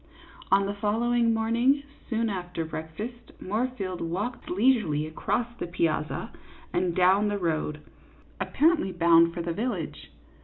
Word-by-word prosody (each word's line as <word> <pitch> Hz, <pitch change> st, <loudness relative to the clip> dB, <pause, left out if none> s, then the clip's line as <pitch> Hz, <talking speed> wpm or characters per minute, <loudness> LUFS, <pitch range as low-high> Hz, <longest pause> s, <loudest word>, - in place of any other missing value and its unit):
On 195 Hz, 0 st, +5 dB
the 200 Hz, -, -2 dB
following 230 Hz, +3 st, +1 dB
morning, 235 Hz, +5 st, +2 dB, 0.3 s
soon 230 Hz, -1 st, +1 dB
after 180 Hz, -5 st, -3 dB
breakfast, 210 Hz, +10 st, -7 dB
Moorfield 210 Hz, -3 st, -2 dB
walked 195 Hz, +9 st, -3 dB
leisurely 195 Hz, -, +2 dB
across 200 Hz, +9 st, -1 dB
the -, -, -3 dB
piazza 165 Hz, -3 st, -1 dB, 0.4 s
and 175 Hz, -1 st, 0 dB
down 190 Hz, +3 st, +4 dB
the 205 Hz, 0 st, 0 dB
road, 155 Hz, -4 st, -1 dB, 0.6 s
apparently 310 Hz, -, +2 dB
bound 170 Hz, -1 st, +5 dB
for 170 Hz, 0 st, -4 dB
the 170 Hz, 0 st, -2 dB
village. 205 Hz, -5 st, -4 dB
195 Hz, 125 wpm, -27 LUFS, 170-230 Hz, 0.6 s, On